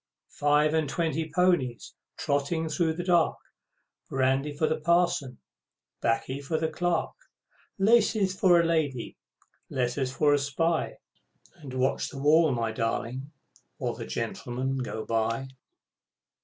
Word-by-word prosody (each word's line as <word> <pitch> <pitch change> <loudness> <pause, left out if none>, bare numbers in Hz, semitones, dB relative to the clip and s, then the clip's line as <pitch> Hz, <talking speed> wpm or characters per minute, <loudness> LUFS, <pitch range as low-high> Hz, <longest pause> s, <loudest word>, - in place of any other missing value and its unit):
Five 150 +1 +2
and 160 -3 +1
twenty 160 -1 -1
ponies, 175 -9 +1 0.2
Trotting 150 +3 -1
through 160 0 +1
the 175 +2 -4
dark, 175 -2 +3 0.7
Brandy 135 +2 +1
for 145 +2 0
the 160 0 0
Parson, 170 -5 +1 0.6
'Baccy 125 +4 -1
for 150 +3 -2
the 160 0 0
Clerk; 170 +1 -1 0.7
Laces 210 -2 +3
for 185 -2 +5
a 170 - +3
lady, 150 -7 -1 0.5
letters 130 +1 -1
for 145 +2 +3
a 145 - +3
spy, 160 +4 -1 0.6
And 140 -6 -9
watch 130 +1 0
the - - -10
wall, 150 +3 +4
my 115 -3 -1
darling, 115 +4 -3 0.5
while - - -2
the - - -7
Gentlemen 130 - -3
go 110 -3 -4
by! 115 +3 -1
145 Hz, 130 wpm, -27 LUFS, 130-165 Hz, 0.7 s, for